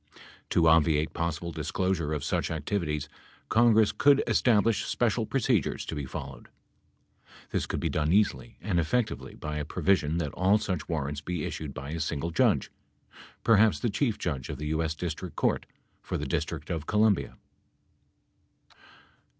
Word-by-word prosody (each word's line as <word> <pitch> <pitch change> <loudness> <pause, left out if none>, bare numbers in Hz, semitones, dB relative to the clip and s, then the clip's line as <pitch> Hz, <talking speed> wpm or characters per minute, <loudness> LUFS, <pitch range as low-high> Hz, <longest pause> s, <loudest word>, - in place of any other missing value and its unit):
To 85 -1 +3
obviate 80 -1 +3
possible 85 0 -2
disclosure 80 +1 -1
of 75 -2 -2
such - - -1
activities, 75 -2 -2 0.4
Congress 110 -2 +5
could 145 -1 +4
establish 115 -2 +3
special 115 -2 0
procedures 120 - 0
to - - -5
be 75 -3 -4
followed. 70 -1 -8 1.0
This - - -1
could - - -2
be - - -1
done 75 +1 0
easily 105 +3 +1
and 95 -5 0
effectively 110 +7 -1
by 75 0 -5
a 75 - -2
provision 80 0 +1
that 80 -4 -2
all 95 +3 +3
such 95 -8 -3
warrants 75 -3 -2
be 85 0 -3
issued 75 -4 -5
by 70 +2 -6
a 80 - -3
single 80 +1 -2
judge 80 - +2 0.4
— - - -20
perhaps 110 -1 +5
the 120 - -1
Chief 110 +2 0
Judge 70 -7 -3
of - - -4
the 75 +1 -4
U.S. 80 0 -1
District 85 +2 -5
Court - - 0 0.3
for - - -3
the - - -4
District - - -3
of 80 -3 -3
Columbia. 105 -2 +2
85 Hz, 155 wpm, -28 LUFS, 75-105 Hz, 1.0 s, Congress